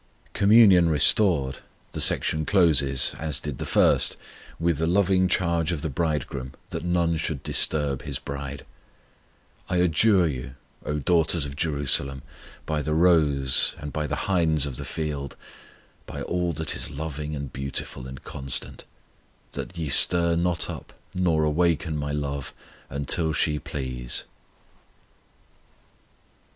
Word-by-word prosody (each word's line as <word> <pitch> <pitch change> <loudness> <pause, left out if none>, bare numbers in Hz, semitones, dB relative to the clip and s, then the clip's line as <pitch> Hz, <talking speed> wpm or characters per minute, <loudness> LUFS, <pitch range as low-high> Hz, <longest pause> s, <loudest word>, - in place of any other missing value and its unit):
Communion 100 -4 +6
fully 80 - +1
restored, 75 -3 +4 0.3
the - - -3
section 80 0 +1
closes, 75 -8 +3
as 75 -3 -1
did 75 -3 -6
the - - -5
first, - - +3 0.4
with 85 -2 0
the 80 - 0
loving 95 0 +2
charge 85 -2 0
of 80 -4 -4
the 80 - -3
Bridegroom 70 -4 -3 0.2
that - - -4
none 85 -2 0
should 80 -3 -4
disturb 70 -4 +2
His 70 -3 -5
bride: 70 -1 -7 1.0
I 90 - 0
adjure 90 +2 +3
you, 65 -3 -6 0.3
O 75 - -1
daughters 80 0 +1
of 70 -1 -7
Jerusalem, 70 -3 0 0.4
By 75 -1 -2
the 75 +1 -2
roes, 75 -6 +2
and 75 -1 -8
by 75 -1 -2
the 75 - -2
hinds 80 -6 +2
of 65 -4 -6
the - - -6
field, 75 -3 -5 0.7
(By - - -6
all 90 -1 -1
that 80 +1 -4
is - - -5
loving 75 0 -5
and 70 -2 -7
beautiful 70 -2 -5
and 65 -1 -10
constant), 70 -1 -3 0.7
That 90 - -7
ye 80 -2 -3
stir 85 +5 +5
not 85 -1 0
up, - - -9 0.2
nor 85 -4 +1
awake 80 +2 +1
My 75 -2 -3
love, 70 -2 -4 0.3
Until 75 +4 +2
she 75 -1 0
please. 65 -5 -5
75 Hz, 140 wpm, -25 LUFS, 70-85 Hz, 1.0 s, Communion